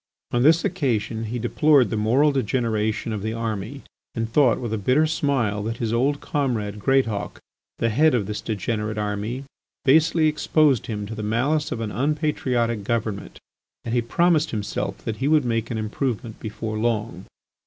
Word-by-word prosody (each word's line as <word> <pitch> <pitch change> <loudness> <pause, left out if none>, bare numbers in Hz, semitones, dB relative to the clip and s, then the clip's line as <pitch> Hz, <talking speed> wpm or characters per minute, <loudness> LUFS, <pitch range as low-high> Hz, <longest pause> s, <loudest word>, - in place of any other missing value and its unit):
On 120 - +1
this 160 +5 +5
occasion 115 - -1
he 115 +3 -3
deplored 125 +1 +3
the - - 0
moral 125 +8 +3
degeneration 115 -4 -1
of 105 - -3
the 110 +2 -2
army, 115 +3 -4 0.3
and 115 -1 -1
thought 125 0 +3
with 120 -3 -4
a - - 0
bitter 130 +9 +3
smile 135 - 0
that 115 +2 -3
his 115 -2 -2
old 140 +5 +1
comrade 110 -8 -2
Greatauk, 115 -4 0 0.4
the 115 - +1
head 150 +6 +4
of 110 -5 0
this 105 +1 -4
degenerate 110 0 -3
army, 105 +5 -3 0.4
basely 155 +3 +4
exposed 150 -3 +2
him 105 -2 -3
to 110 - -6
the 110 - -5
malice 130 +8 0
of 115 - -3
an 110 -2 -3
unpatriotic 125 - 0
government. 110 -2 -3 0.5
And 115 - -3
he 120 - +3
promised 160 +6 +2
himself 105 -3 -3
that 110 -1 -3
he 135 - -1
would 150 -3 +3
make 115 -1 -1
an 115 - -3
improvement 110 +1 -3
before 110 0 -4
long. 110 -5 -2
115 Hz, 170 wpm, -23 LUFS, 110-140 Hz, 0.5 s, this